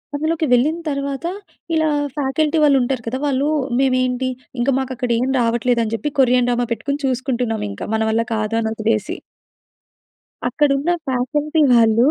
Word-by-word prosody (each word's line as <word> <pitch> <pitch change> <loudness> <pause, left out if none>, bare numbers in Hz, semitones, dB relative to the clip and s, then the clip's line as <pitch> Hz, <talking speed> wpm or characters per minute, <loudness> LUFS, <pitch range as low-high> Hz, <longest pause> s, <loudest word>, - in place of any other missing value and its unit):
అందులోకి 315 +2 0
వెళ్ళిన 295 +7 +3
తర్వాత 280 +2 -3 0.5
ఇలా 315 -1 +2 0.3
ఫ్యాకల్టీ 295 +3 0
వాళ్ళు 280 -2 +5
ఉంటారు 245 -1 -1
కదా! 255 +3 -2
వాళ్ళు 280 +1 +1 0.3
మేమేంటి, 255 -1 +1 0.3
ఇంక 245 +3 +1
మాకు 265 -1 -4
అక్కడ 245 0 -3
ఏం 255 +2 0
రావట్లేదు 235 +1 +1
అని 220 0 -3
చెప్పి, 295 +5 -3
కొరియన్ 250 -1 +4
డ్రామా 240 -1 0
పెట్టుకొని 280 +4 -2
చూసుకుంటున్నాం 250 -3 -1
ఇంకా. 100 - -6
మన 220 - 0
వల్ల 230 +1 +1
కాదు 215 +1 -1
అని 220 - -1
వదిలేసి. 220 -1 -1 1.3
అక్కడున్న 290 +1 +1 0.2
ఫ్యాకల్టీ 295 +5 0
వాళ్ళు 230 +1 +5
255 Hz, 150 wpm, -20 LUFS, 235-280 Hz, 1.3 s, వాళ్ళు